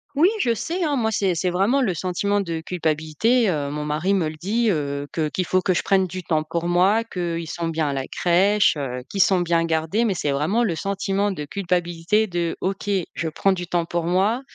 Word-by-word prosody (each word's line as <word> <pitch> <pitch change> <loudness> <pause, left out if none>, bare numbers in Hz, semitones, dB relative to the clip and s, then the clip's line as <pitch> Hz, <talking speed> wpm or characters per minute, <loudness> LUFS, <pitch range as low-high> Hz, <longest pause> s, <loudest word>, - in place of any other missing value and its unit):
Oui, 315 +5 +5
je 235 -2 +2
sais, 345 - -3
hein, 295 -3 +1
moi 220 -3 +1
c'est 195 -4 0
c'est 180 +2 0
vraiment 200 +10 +2
le 200 -8 +1
sentiment 195 +4 -1
de 165 -4 -3
culpabilité, 165 +8 0
heu, 145 -4 -1
mon 150 +1 -4
mari 155 +6 0
me 180 -5 +1
le 155 - -6
dit, 220 +8 0
heu, 145 -4 -2
que 155 -2 -1
qu'il 180 +2 -2
faut 185 +2 +1
que 185 0 +1
je - - 0
prenne 190 -1 +3
du 185 +1 -6
temps 155 -2 0
pour 170 +2 -3
moi, 190 +6 +3
qu'ils 170 -5 -4
sont 170 -1 -3
bien 160 -2 -1
à 140 - -1
la 135 -1 -3
crèche, 195 +4 +3
heu, 125 -4 -4
qu'ils 195 - 0
sont 190 -2 +2
bien 170 -1 +1
gardés, 165 +7 0
mais 210 -4 +1
c'est 150 -5 -1
vraiment 190 +12 +1
le 175 - -1
sentiment 200 +2 -1
de 150 -5 -5
culpabilité 175 +3 0
de 170 -3 -2
«OK, 195 +2 -3 0.2
je 160 - -2
prends 195 +5 +1
du 175 -2 -5
temps 175 -1 0
pour 170 0 -2
moi 190 +8 +1
180 Hz, 225 wpm, -23 LUFS, 160-200 Hz, 0.2 s, Oui